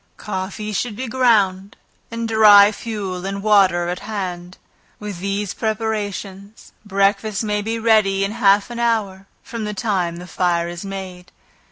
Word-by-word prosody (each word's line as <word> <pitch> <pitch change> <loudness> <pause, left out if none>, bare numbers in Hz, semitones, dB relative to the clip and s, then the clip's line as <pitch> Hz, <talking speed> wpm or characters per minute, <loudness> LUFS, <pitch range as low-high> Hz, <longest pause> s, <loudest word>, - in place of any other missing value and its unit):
Coffee 210 +2 -5
should 220 +1 -2
be 255 +4 -5
ground, 210 -6 +1 0.3
and 230 0 -4
dry 210 -2 +7
fuel, 200 -5 -5
and 195 +1 -4
water 190 -5 +4
at 180 +1 -3
hand. 180 -4 -6 0.4
With 205 -4 -6
these 200 +1 -2
preparations, 210 -2 -4
breakfast 200 +1 0
may 210 -1 -1
be 225 +2 -3
ready 215 -4 +3
in 200 - -4
half 205 -1 +3
an 235 - -6
hour 205 -5 -1 0.2
from 230 -2 -6
the 210 0 -4
time 185 -5 -1
the 175 - -9
fire 175 -2 0
is 175 +1 -7
made. 190 -2 -8
200 Hz, 150 wpm, -20 LUFS, 190-220 Hz, 0.4 s, dry